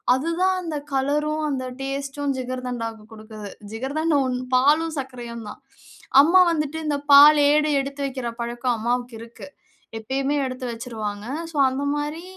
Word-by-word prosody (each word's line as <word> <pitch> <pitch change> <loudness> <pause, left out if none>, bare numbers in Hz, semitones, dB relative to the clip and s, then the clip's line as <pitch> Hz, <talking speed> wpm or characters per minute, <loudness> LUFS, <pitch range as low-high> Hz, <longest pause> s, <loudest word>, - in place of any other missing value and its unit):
அதுதான் 335 +7 0
அந்த 330 -3 -5 0.2
கலரும் 300 +3 0
அந்த 260 -2 -2 0.2
டேஸ்ட்டும் 275 +1 -3
ஜிகர்தண்டாவுக்கு 245 -4 -5
குடுக்குது. 215 -2 -10 0.2
ஜிகர்தண்டா 290 +7 0
ஒன்ம் 250 0 -3
பாலும், 305 +5 +3
சர்க்கரையும் 240 -4 -7
தான். - - -10 0.6
அம்மா 340 +5 +5
வந்துட்டு, 300 -1 -2
இந்த 290 -1 0 0.2
பால் 295 +2 +9
ஏடு 300 +1 +3
எடுத்து 275 +1 -6
வைக்கிற 260 -2 -5
பழக்கம், 240 +1 -1
அம்மாவுக்கு 240 +1 -2
இருக்கு. 230 +3 -11 0.5
எப்பயுமே 270 +5 -2
எடுத்து 255 0 -5
வச்சிருவாங்க. 220 -3 -5 0.3
சோ, - - -16
அந்த 265 +2 -3
மாரி 295 +3 -4
265 Hz, 135 wpm, -23 LUFS, 240-295 Hz, 0.6 s, பால்